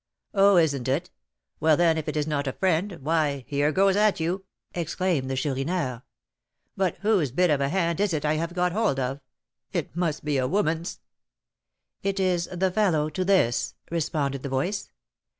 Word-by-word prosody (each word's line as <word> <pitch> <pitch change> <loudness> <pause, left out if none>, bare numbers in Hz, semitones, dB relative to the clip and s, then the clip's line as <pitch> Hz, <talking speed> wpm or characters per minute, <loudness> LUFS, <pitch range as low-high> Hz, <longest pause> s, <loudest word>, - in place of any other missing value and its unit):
"Oh! 200 -1 +5
isn't 140 -6 +2
it? 135 +6 -1 0.5
Well, 155 -1 +4
then, 170 -2 +4
if 160 -1 -4
it 155 - -3
is 150 - +1
not 145 -2 -1
a 135 - -1
friend, 185 +1 0
why, 150 -4 0
here 145 +1 +1
goes 195 +3 +3
at 210 -2 +3
you," 180 +4 -2 0.3
exclaimed 170 -4 -1
the 135 - -1
Chourineur. 135 -1 -1 0.7
"But 190 -2 0
whose 200 -9 +2
bit 175 +7 +2
of 145 -2 +2
a 140 - +1
hand 170 0 0
is 205 -1 +2
it 155 -2 -1
I 150 - +2
have 165 +3 -2
got 180 0 +1
hold 205 -8 +1
of? 130 +2 -2 0.5
It - - -3
must 165 -4 -1
be 145 -2 +1
a 130 - +1
woman's!" 165 - -1 1.0
"It 195 0 -1
is 180 -2 +1
the 185 +1 0
fellow 170 -7 +1
to 185 +5 -1
this," 185 -11 +2 0.2
responded 145 -4 -1
the 140 - -5
voice. 160 +10 -2
160 Hz, 180 wpm, -26 LUFS, 145-185 Hz, 1.0 s, Oh